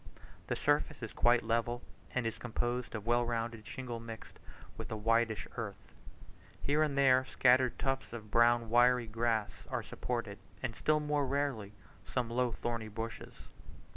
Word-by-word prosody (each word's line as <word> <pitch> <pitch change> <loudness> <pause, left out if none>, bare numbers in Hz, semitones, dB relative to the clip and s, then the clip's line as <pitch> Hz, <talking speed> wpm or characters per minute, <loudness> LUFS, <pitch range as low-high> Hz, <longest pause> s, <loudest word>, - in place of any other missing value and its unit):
The - - 0
surface 145 -2 +1
is 110 - -5
quite 120 0 +4
level, 115 +2 0 0.3
and 130 -2 +1
is 115 0 -3
composed 120 +1 -2
of 105 -1 -5
well 120 +1 +3
rounded 115 -2 -3
shingle 125 -3 -5
mixed 115 -1 -9 0.4
with - - -7
a - - -1
whitish 115 -2 +1
earth. - - -6 0.7
Here 145 +2 +1
and 150 -3 +1
there 130 -2 +5
scattered 130 -1 +3
tufts 135 0 -1
of 110 -3 -8
brown 120 0 +4
wiry 120 0 +5
grass 115 -1 -1
are - - -2
supported, 115 -5 -4 0.2
and 120 -3 -2
still 155 0 +2
more 150 -2 0
rarely, 130 -7 -1 0.3
some 120 -3 -2
low 125 0 +1
thorny 115 -1 -3
bushes. 115 +1 -6
120 Hz, 155 wpm, -33 LUFS, 115-130 Hz, 0.7 s, there